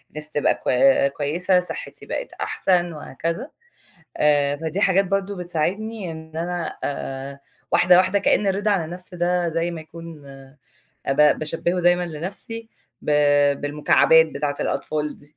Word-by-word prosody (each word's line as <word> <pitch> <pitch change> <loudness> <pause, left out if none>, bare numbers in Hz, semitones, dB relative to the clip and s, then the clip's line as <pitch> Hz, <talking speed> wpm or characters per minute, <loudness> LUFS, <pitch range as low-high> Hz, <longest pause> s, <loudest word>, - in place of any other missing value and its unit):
نَفْسي 150 0 -1
تبقى - - +2
كوي 135 +2 +3
كويّسة 165 +6 +1
صحّتي 180 - -7
بقِت - - -5
أحسن 175 -2 0
وهكذا 165 - -5 0.7
آآ، 145 -1 +2
فدي 160 +5 -3
حاجات 195 0 +3
برضه 195 +1 -1
بتساعدني 180 +4 -3
إن 160 0 -10
أنا 175 0 -3
آآ، 140 0 -5 0.3
واحدة، 180 0 +6
واحدة 185 +2 +3
كأن 205 - +2
الرِضا 200 +2 +1
عن 195 -5 +1
النَفّس 180 +3 -7
ده 175 0 0
زي 165 +1 -1
ما 170 -2 -6
يكون 160 -2 -11
آآ، 135 0 -14 0.6
ب 150 +1 +4
باشبِّهُه 165 +3 -1
دايمًا 175 0 +3
لنفسي 195 +8 -6 0.3
ب - - -3 0.5
بالمكعبات 150 +2 +4
بتاعة 145 -1 -3
الأطفال 150 -1 -2
دي، 145 +1 -19
165 Hz, 140 wpm, -22 LUFS, 150-185 Hz, 0.7 s, واحدة